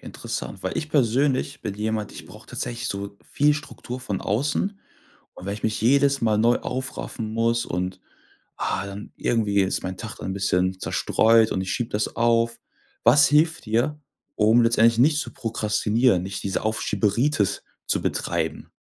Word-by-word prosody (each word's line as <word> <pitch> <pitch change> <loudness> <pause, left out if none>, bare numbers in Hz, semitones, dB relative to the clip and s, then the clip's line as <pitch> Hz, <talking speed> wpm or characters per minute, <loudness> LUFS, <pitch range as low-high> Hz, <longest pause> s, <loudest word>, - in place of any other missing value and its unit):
Interessant, - - -6
weil - - -3
ich 155 - -3
persönlich 135 +1 +1
bin 100 - -3
jemand, 105 0 -2
ich - - -10
brauch - - -14
tatsächlich 120 -1 -4
so 100 0 -5 0.2
viel 150 +1 +4
Struktur 130 -3 -7
von 105 -7 -3
außen 145 - -1 0.6
und 90 - -11
wenn 100 - -2
ich 105 - -8
mich 110 -1 0
jedes 140 +2 +3
Mal 110 -2 +2
neu 120 +2 +4
aufraffen 125 -3 -4
muss 115 +1 +1
und, 90 +1 -3 0.6
ah, 100 - -2
dann 100 +1 -8
irgendwie 105 -4 +1
ist 95 - 0
mein 95 0 -5
Tag 110 -2 -7
dann 95 - -4
bisschen 95 -1 0
zerstreut 115 0 +3
und 95 - -1
ich 95 - -3
schiebe 120 -1 -2
das 105 0 -2
auf. 115 0 +2 0.4
Was 145 +5 +6
hilft 155 -2 +2
dir, 125 +8 0 0.3
um 110 +3 +4
letztendlich 115 0 +4
nicht 150 +4 +4
zu - - -4
prokrastinieren, 110 -3 +1
nicht 95 +1 -5
diese 95 -2 -2
Aufschieberitis 110 +2 0 0.2
zu - - +1
betreiben? - - -2
115 Hz, 160 wpm, -24 LUFS, 100-130 Hz, 0.6 s, Was